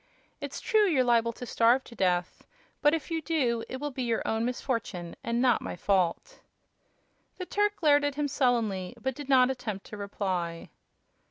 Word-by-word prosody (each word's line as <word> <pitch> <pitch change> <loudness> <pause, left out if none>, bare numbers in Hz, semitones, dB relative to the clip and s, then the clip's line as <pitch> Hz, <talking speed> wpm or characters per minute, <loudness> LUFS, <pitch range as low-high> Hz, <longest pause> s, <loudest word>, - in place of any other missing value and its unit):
It's - - -6
true 430 -2 +3
you're 285 -8 +3
liable 235 -1 +3
to 245 - -8
starve 240 +3 +3
to - - -13
death, 180 -4 -1 0.3
but 295 +1 +4
if 325 +1 -6
you 325 -1 -1
do 255 -8 0
it 260 - -5
will 295 +1 -3
be 260 - -5
your 235 -2 0
own 220 0 0
misfortune 230 -8 -3
and 235 0 -1
not 245 -3 +3
my - - -5
fault." 190 - 0 1.0
The 365 - -5
Turk 415 +2 +1
glared 290 -5 +4
at 290 -1 -1
him 295 0 0
sullenly, 240 -8 0
but 265 +3 -2
did 280 +1 -9
not 260 -1 +5
attempt 215 -6 -5
to 210 - -9
reply. 185 -4 -3
245 Hz, 180 wpm, -28 LUFS, 210-290 Hz, 1.0 s, not